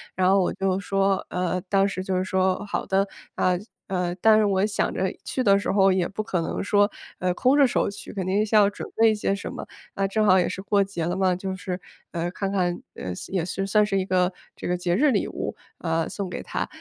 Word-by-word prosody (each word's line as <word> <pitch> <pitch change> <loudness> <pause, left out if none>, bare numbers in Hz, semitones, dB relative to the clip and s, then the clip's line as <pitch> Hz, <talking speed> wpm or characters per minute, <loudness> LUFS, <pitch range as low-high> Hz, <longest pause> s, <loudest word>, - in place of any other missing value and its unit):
然 185 -1 +2
后 195 0 +5
我 180 - +1
就 190 -1 0
说， 195 0 +1
呃， 180 0 -1
当 195 -1 +3
时 185 -1 -4
就 190 -1 -1
是 185 - +1
说 190 +1 0
好 205 - -3
的。 195 +1 +1 0.3
呃， 180 -1 +2 0.3
呃， 180 -2 -1
但 220 -1 +6
是 215 - +3
我 195 -1 +2
想 210 - -1
着 - - 0
去 255 - -2
的 200 -3 +5
时 - - -1
候 195 -1 +4
也 185 -2 +1
不 215 +2 -4
可 180 -5 -1
能 - - -3
说， 205 0 +3 0.3
呃， 180 0 +1
空 255 +9 +3
着 280 -3 +6
手 - - +1
去， 200 - -10
肯 190 -3 -3
定 195 +3 +2
是 220 - -1
要 205 -2 +6
准 205 - -7
备 225 0 +5
一 - - 0
些 200 -1 0
什 200 - -6
么， - - -7 0.3
啊， 195 0 0
正 215 +2 +1
好 190 -2 +6
也 - - +2
是 190 - -5
过 200 0 +2
节 190 -4 -4
了 175 +2 -1
嘛， 185 -1 +2
就 190 +1 -4
是， 185 -1 -4 0.3
呃， 170 0 -2
看 195 +1 -3
看， 180 -3 0
呃， 90 - -5 0.2
也 185 -3 0
是 195 +2 -3
算 210 +1 +4
是 195 -2 0
一 185 - -1
个 185 -1 +2 0.2
这 - - -6
个 180 - 0
节 175 0 0
日 290 +7 +4
礼 - - +1
物， - - -4 0.2
呃， 165 -1 0
送 200 -3 -4
给 - - -5
他。 - - -3
195 Hz, 270 characters per minute, -25 LUFS, 185-200 Hz, 0.3 s, 但